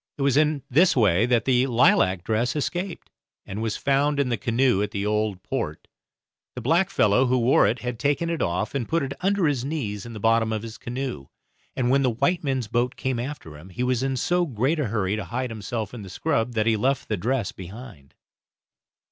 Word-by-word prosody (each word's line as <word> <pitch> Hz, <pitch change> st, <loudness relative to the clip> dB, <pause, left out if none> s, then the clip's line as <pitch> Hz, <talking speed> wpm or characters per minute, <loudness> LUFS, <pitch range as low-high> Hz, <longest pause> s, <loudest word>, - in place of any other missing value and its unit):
It 140 Hz, -, -2 dB
was 140 Hz, -1 st, +2 dB
in 150 Hz, -2 st, +2 dB
this 165 Hz, +8 st, +4 dB
way 105 Hz, -2 st, +3 dB
that 120 Hz, -3 st, +2 dB
the 130 Hz, 0 st, +3 dB
lilac 95 Hz, -7 st, +3 dB
dress 115 Hz, +5 st, 0 dB
escaped, 175 Hz, +5 st, -3 dB, 0.3 s
and 100 Hz, +3 st, -5 dB
was 110 Hz, -2 st, -2 dB
found 140 Hz, +1 st, +1 dB
in 140 Hz, -3 st, +1 dB
the 120 Hz, -, +1 dB
canoe 120 Hz, -2 st, +1 dB
at 105 Hz, -, -1 dB
the 100 Hz, 0 st, -3 dB
Old 105 Hz, -3 st, -1 dB
Port; 75 Hz, +1 st, -4 dB, 0.7 s
the -, -, -4 dB
blackfellow 130 Hz, -, +3 dB
who 130 Hz, +1 st, +2 dB
wore 120 Hz, +2 st, +4 dB
it 115 Hz, +1 st, -1 dB
had 125 Hz, -2 st, -4 dB
taken 145 Hz, +5 st, 0 dB
it 165 Hz, -1 st, -2 dB
off 95 Hz, +4 st, -1 dB
and 135 Hz, -5 st, -3 dB
put 165 Hz, -1 st, +1 dB
it 135 Hz, 0 st, -3 dB
under 195 Hz, -1 st, +2 dB
his 140 Hz, -5 st, 0 dB
knees 120 Hz, -9 st, -3 dB
in 120 Hz, -, -9 dB
the 110 Hz, -, -7 dB
bottom 115 Hz, +1 st, +2 dB
of 110 Hz, -1 st, -2 dB
his 115 Hz, -1 st, -8 dB
canoe, 120 Hz, -, -5 dB, 0.5 s
and 125 Hz, -1 st, +1 dB
when 135 Hz, +1 st, +4 dB
the 130 Hz, -, +2 dB
white 165 Hz, +10 st, 0 dB
men's 130 Hz, -5 st, -1 dB
boat 120 Hz, +3 st, 0 dB
came 130 Hz, -2 st, -2 dB
after 125 Hz, -, -6 dB
him, 90 Hz, +5 st, -13 dB
he 120 Hz, +7 st, -4 dB
was 125 Hz, -1 st, +1 dB
in 135 Hz, 0 st, -1 dB
so 175 Hz, +6 st, +1 dB
great 135 Hz, +5 st, 0 dB
a 150 Hz, -, +1 dB
hurry 105 Hz, -2 st, -1 dB
to 105 Hz, -3 st, -4 dB
hide 125 Hz, +4 st, -3 dB
himself 110 Hz, 0 st, -4 dB
in 120 Hz, -, -7 dB
the 95 Hz, -, -9 dB
scrub 120 Hz, -, -1 dB
that 110 Hz, -2 st, +1 dB
he 115 Hz, -1 st, +3 dB
left 130 Hz, +5 st, 0 dB
the 110 Hz, -, 0 dB
dress 115 Hz, +2 st, -1 dB
behind. 95 Hz, -, -11 dB
120 Hz, 215 wpm, -24 LUFS, 110-135 Hz, 0.7 s, this